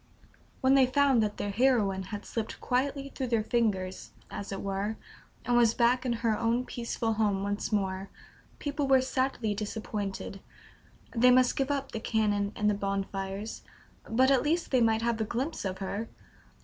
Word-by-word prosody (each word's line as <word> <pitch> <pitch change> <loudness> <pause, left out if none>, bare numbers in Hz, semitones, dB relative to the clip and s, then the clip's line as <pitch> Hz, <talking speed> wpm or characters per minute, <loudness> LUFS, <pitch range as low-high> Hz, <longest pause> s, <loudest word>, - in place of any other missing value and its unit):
When 265 0 +4
they 270 -2 +6
found 270 -2 +4
that 210 -1 -1
their 205 - -2
heroine 215 -4 +2
had 205 -1 -6
slipped 225 -2 -4
quietly 275 +2 -1
through 260 - -3
their 230 -2 +1
fingers, 210 -6 -1 0.2
as 200 - -6
it 195 - -4
were, 200 +2 -2 0.5
and 245 - +2
was 235 -1 +4
back 250 +2 +3
in 240 - +1
her 220 -2 +3
own 230 +3 0
peaceful 235 -2 -2
home 205 -3 +1
once 205 +2 -2
more, 195 -2 -1 0.5
people 290 -1 -2
were 265 -1 +6
sadly 255 -4 0
disappointed. 205 -2 -4 0.8
They 245 +2 +6
must 250 0 +5
give 270 -2 0
up 275 -1 -2
the 225 - -4
cannon 205 -3 0
and 210 - 0
the 210 - +4
bonfires; 195 +1 -3 0.5
but 260 +4 +4
at 270 - +4
least 325 +3 0
they 255 -2 +4
might 225 0 +3
have 230 -1 0
a - - +3
glimpse 250 +5 -3
of 190 -1 -2
her! 200 +3 -4
225 Hz, 175 wpm, -29 LUFS, 205-255 Hz, 0.8 s, they